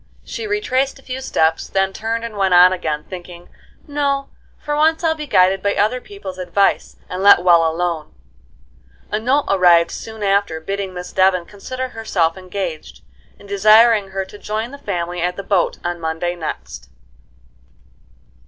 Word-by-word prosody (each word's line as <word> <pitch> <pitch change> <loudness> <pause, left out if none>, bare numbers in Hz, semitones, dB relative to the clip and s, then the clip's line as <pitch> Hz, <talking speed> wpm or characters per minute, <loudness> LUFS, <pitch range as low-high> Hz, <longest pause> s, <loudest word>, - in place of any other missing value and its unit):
She 450 - -6
retraced 275 -11 0
a 270 - -18
few 260 0 -6
steps, 160 -10 0
then 195 0 0
turned 225 +2 -3
and 230 -2 -6
went 190 -2 +2
on 180 +1 +7
again, 155 -4 -3
thinking, 175 -1 -10 0.4
"No; 280 -1 -1 0.3
for 295 0 -3
once 320 +2 +2
I'll 325 -1 +3
be 305 -2 -7
guided 190 -5 +3
by 200 +1 0
other 225 +5 +1
people's 395 - -9
advice, 185 +2 0
and 185 +1 -5
let 200 -3 +7
well 170 -2 +5
alone." 165 - -3 1.0
A 210 - 0
note 265 +6 +1
arrived 175 -3 +4
soon 220 -1 -7
after, 200 -4 +1
bidding 195 +2 -4
Miss 180 0 -7
Devon 185 -2 +3
consider 255 +7 -6
herself 185 -8 -1
engaged, 180 - -6 0.4
and 200 - -16
desiring 215 +1 +5
her 190 0 -3
to 205 +2 -13
join 220 +3 -4
the 280 - -10
family 175 -5 -3
at 180 +1 -1
the 195 - -6
boat 195 -3 +1
on 175 0 -3
Monday 160 +2 -2
next. 65 - -7
195 Hz, 160 wpm, -19 LUFS, 175-230 Hz, 1.0 s, on